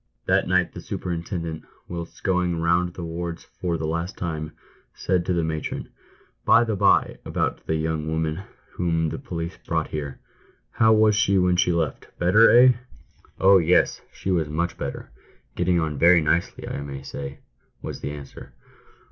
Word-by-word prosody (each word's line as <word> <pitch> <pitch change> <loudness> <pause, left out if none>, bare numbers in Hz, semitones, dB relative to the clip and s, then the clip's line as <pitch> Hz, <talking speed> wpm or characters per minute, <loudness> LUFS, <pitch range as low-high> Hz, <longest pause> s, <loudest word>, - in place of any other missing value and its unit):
That - - +2
night - - +2
the - - -8
superintendent, 85 -2 -4 0.2
whilst 85 -1 -7
going 90 -3 +1
round 85 +1 +1
the 90 - -6
wards 85 0 -5
for 85 -2 -3
the 80 - -3
last 85 +3 -3
time, 80 -3 -4 0.4
said 90 -1 0
to 90 - +2
the 85 -1 +1
matron: 80 -1 -4 0.3
" - - -32
By 120 - +6
the 110 -2 -1
by! - - +3
about - - -2
that 80 - +1
young 80 -1 -2
woman 80 +2 -1 0.3
whom 80 -2 0
the - - -5
policeman 85 -10 -6
brought - - -1
here; 70 -3 -5 0.5
how 110 -1 +4
was 110 -1 +5
she 100 -2 +3
when 90 -1 +3
she 90 - +2
left? 80 -4 -2
Better— 100 +6 +5
eh 125 +2 +7 0.2
?" - - -29
" - - -30
Oh, 95 0 +7
yes, 85 +1 +2
she 95 - -4
was 80 -4 +1
much 85 +2 -1
better - - -6 0.2
— 60 +1 -37
getting 90 0 +2
on 75 -4 -2
very 85 +2 +7
nicely, 85 +3 -1
I - - -4
may 70 -1 -7
say," 70 0 -7 0.5
was - - -5
the - - -4
answer. 75 -1 -10
85 Hz, 180 wpm, -24 LUFS, 80-90 Hz, 0.5 s, eh